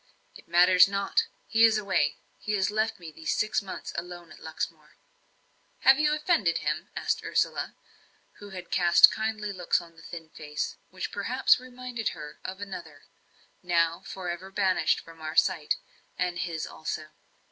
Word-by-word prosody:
"It - - -14
matters 180 +2 +7
not 200 - +1 0.2
he 225 0 +3
is 225 -1 +6
away. 190 -8 +1 0.2
He 210 - -3
has 195 0 +1
left 220 0 0
me 165 -3 -9
these 160 +1 -2
six 215 - +1
months 195 - -7
alone 175 0 -7
at - - -13
Luxmore." 160 -1 -6 0.9
"Have 265 +1 +6
you 300 0 +3
offended 300 - +2
him?" - - -2
asked - - -1
Ursula, - - 0 0.6
who 205 - -10
had 180 -2 -9
cast 175 -2 +7
kindly 215 -1 -2
looks 180 -2 +1
on 170 -1 -14
the 160 - -15
thin 165 -1 -9
face, 150 -1 -4
which - - -5
perhaps - - +3
reminded 250 -2 -4
her 150 -1 -9
of 190 +1 -6
another 170 -7 -8 0.6
now 170 -1 +2
for 190 -2 -7
ever 175 +2 -4
banished 190 -5 +2
from 165 -1 -14
our 155 0 -5
sight, - - +3 0.4
and 175 -1 -1
his 165 -3 -2
also. 155 0 -5
180 Hz, 160 wpm, -28 LUFS, 165-210 Hz, 0.9 s, matters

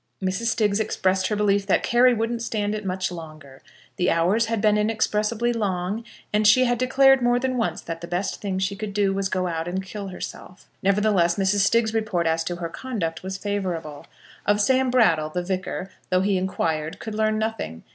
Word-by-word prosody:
Mrs. 190 +4 -2
Stiggs 210 -2 +1
expressed 190 -3 +1
her 210 - -1
belief 200 -1 +1
that 195 - +2
Carry 245 +2 +5
wouldn't 230 0 -1
stand 210 -3 -1
it 215 0 -4
much 185 0 -2
longer. 155 -5 -10 0.4
The 180 -1 +2
hours 190 +8 +2
had 225 -1 -1
been 210 0 +3
inexpressibly 215 +2 0
long, 200 -1 -2 0.3
and 210 0 +3
she 255 +4 +6
had 245 -1 0
declared 270 +1 +5
more 245 0 +3
than 260 +1 -1
once 180 -9 -1
that 165 0 -6
the 170 - -6
best 180 +3 -3
thing 195 -2 -2
she 190 +1 -1
could 200 -1 -6
do 200 -2 +2
was 195 0 -2
to - - -15
go 185 0 0
out 165 -1 -3
and 190 +2 -3
kill 200 +1 -6
herself. 180 0 -9
Nevertheless, 195 -3 +2
Mrs. 195 +1 +1
Stiggs's 230 -1 +2
report 215 -6 0
as 165 0 +1
to 175 - -2
her 170 -1 -4
conduct 170 -8 -4
was 190 +1 -5
favourable. 180 -7 -4 0.4
Of 205 0 +2
Sam 260 +4 +3
Brattle, 165 -12 +3
the 180 +3 -3
Vicar, 185 +1 -4 0.2
though 185 0 +3
he 200 +1 +1
inquired, 165 -4 -1
could 220 - -7
learn 215 0 +1
nothing. 220 - -3
200 Hz, 200 wpm, -24 LUFS, 180-220 Hz, 0.4 s, she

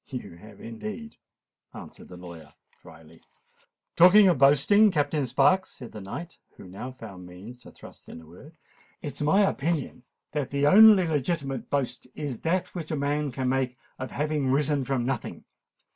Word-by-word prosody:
"You 110 -9 -8
have 105 +2 -15
indeed," 215 - -8 0.6
answered - - -12
the 90 - -12
lawyer 85 -4 -12 0.3
drily. 80 0 -17 0.7
"Talking 190 +4 +7
of 170 -7 +1
boasting, 150 +10 +5
Captain 145 -4 -1
Sparks," 140 +10 +2
said 125 -3 -10
the 105 - -9
knight, 165 - -8 0.2
who - - -12
now 105 +8 -8
found 95 -7 -11
means 100 +8 -12
to - - -15
thrust - - -15
in - - -10
a 80 - -15
word, 135 - -16 0.5
"it 145 - -5
is - - -8
my 175 +8 +3
opinion 160 -8 -1 0.3
that 145 -3 -3
the 140 0 0
only 205 +3 +7
legitimate 140 -3 -3
boast 140 -3 -3
is 145 -6 -5
that 175 +3 -1
which 165 -4 -6
a 155 - -2
man 145 0 -1
can 130 0 -3
make 130 -1 -1 0.2
of 130 - -5
having 150 -1 -2
risen 145 +1 +1
from 130 -2 -2
nothing. 135 +1 -4
140 Hz, 170 wpm, -26 LUFS, 120-155 Hz, 0.7 s, Talking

